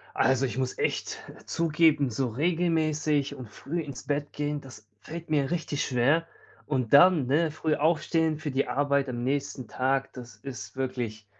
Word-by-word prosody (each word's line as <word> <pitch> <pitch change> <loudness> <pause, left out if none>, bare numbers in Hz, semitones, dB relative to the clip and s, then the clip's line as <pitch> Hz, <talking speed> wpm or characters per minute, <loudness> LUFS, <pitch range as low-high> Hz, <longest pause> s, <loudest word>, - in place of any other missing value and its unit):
Also, 130 0 +3
ich 130 -1 -2
muss 130 -1 -1
echt - - -1 0.3
zugeben, 155 -4 +3
so 125 +3 -1
regelmäßig 155 -1 +1
und 125 -4 -9
früh 150 +10 -4
ins 140 -5 -7
Bett 145 0 -2
gehen, 145 0 -2
das 110 -6 -13
fällt 165 0 -8
mir 145 -3 +1
richtig 160 -4 -1
schwer, 140 +7 +2 0.4
und 130 -6 -1
dann, 160 -1 +7
ne, 155 +5 +2
früh 155 0 -1
aufstehen 160 0 +1
für 155 -1 -4
die 135 +1 0
Arbeit 140 -1 +1
am 120 -1 -3
nächsten 135 -1 -2
Tag, 135 +1 0
das 125 -2 -10
ist 135 -1 -8
wirklich 120 -5 -3
140 Hz, 165 wpm, -27 LUFS, 130-155 Hz, 0.4 s, dann